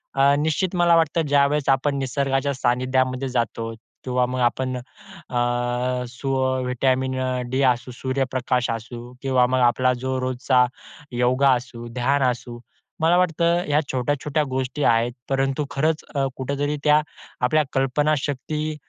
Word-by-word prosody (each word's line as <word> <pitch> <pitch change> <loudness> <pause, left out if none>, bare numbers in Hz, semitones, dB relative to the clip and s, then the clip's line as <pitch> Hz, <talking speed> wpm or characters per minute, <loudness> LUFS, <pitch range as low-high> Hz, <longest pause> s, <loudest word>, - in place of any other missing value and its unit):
अ, 140 +1 +4
निश्चित 160 +5 0
मला 175 -1 +4
वाटतं 165 0 +2
ज्यावेळेस 140 0 +2
आपण 140 +1 +2
निसर्गाच्या 135 +1 0
सानिध्यामध्ये 130 +1 0
जातो 115 -2 -2 0.3
किंवा 125 -1 +1
मग 125 +1 -3
आपण, 130 +1 -1
अ, 125 0 -13 0.7
सु 130 +2 -6 0.4
व्हिटॅमिन 130 +1 0
अ, 130 -1 -1
डी 130 - +1
असू, 125 -1 +1
सूर्यप्रकाश 130 -1 -1
असू 120 +2 -7
किंवा 130 -2 +3
मग 130 +1 +1
आपला 125 +1 +1
जो 130 0 -1
रोजचा 130 0 +2 0.5
योगा 125 +3 +3
असू, 120 -1 -7
ध्यान 135 +3 +1
असू, 120 -1 -6 0.4
मला 170 +2 +4
वाटतं 170 -1 +2
ह्या 145 +1 +3
छोट्या-छोट्या 145 +4 0
गोष्टी 130 +2 -2
आहेत, 115 +1 +3 0.2
परंतु 135 +2 0
खरंच 155 +3 0
अ, 135 - +1
कुठेतरी 140 +3 -2
त्या 150 0 +5 0.4
आपल्या 155 +5 +3
कल्पनाशक्ती 150 +2 -1
130 Hz, 135 wpm, -23 LUFS, 125-145 Hz, 0.7 s, त्या